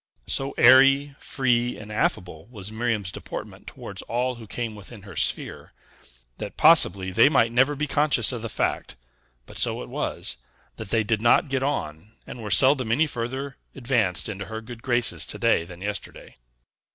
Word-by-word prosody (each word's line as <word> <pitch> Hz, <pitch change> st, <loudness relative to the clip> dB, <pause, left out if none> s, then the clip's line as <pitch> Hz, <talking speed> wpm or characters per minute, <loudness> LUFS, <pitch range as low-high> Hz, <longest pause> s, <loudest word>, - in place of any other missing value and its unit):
So 135 Hz, -, -2 dB
airy, 135 Hz, +3 st, +6 dB
free, 125 Hz, -3 st, 0 dB
and 105 Hz, 0 st, -10 dB
affable 90 Hz, -6 st, -2 dB
was 105 Hz, -4 st, -9 dB
Miriam's 110 Hz, -4 st, -2 dB
deportment -, -, -8 dB
towards -, -, -9 dB
all 125 Hz, +2 st, -2 dB
who 115 Hz, -2 st, -12 dB
came 115 Hz, +2 st, -4 dB
within 105 Hz, 0 st, -12 dB
her 95 Hz, -4 st, -11 dB
sphere, -, -, -2 dB, 0.7 s
that 105 Hz, -, -7 dB
possibly 100 Hz, -, +5 dB
they 115 Hz, +8 st, +5 dB
might 115 Hz, -6 st, +3 dB
never 130 Hz, +5 st, +3 dB
be 150 Hz, +2 st, -2 dB
conscious 150 Hz, 0 st, +3 dB
of 120 Hz, -3 st, -5 dB
the 115 Hz, -, -5 dB
fact, -, -, -2 dB, 0.5 s
but -, -, -8 dB
so -, -, 0 dB
it -, -, -11 dB
was, -, -, -3 dB, 0.4 s
that 110 Hz, -3 st, -8 dB
they 115 Hz, 0 st, +1 dB
did 110 Hz, 0 st, -1 dB
not 120 Hz, +6 st, +3 dB
get 135 Hz, -1 st, -1 dB
on, 100 Hz, -, -4 dB
and 120 Hz, -, -9 dB
were 105 Hz, -, -6 dB
seldom 130 Hz, +3 st, +4 dB
any 150 Hz, +7 st, +3 dB
further 135 Hz, +1 st, -5 dB, 0.2 s
advanced 115 Hz, -9 st, 0 dB
into 100 Hz, -2 st, -6 dB
her 110 Hz, 0 st, -6 dB
good 115 Hz, +1 st, -11 dB
graces 120 Hz, -2 st, +1 dB
to -, -, -3 dB
day 85 Hz, -, +2 dB
than 90 Hz, +1 st, -12 dB
yesterday. 105 Hz, -1 st, -6 dB
115 Hz, 175 wpm, -24 LUFS, 105-130 Hz, 0.7 s, airy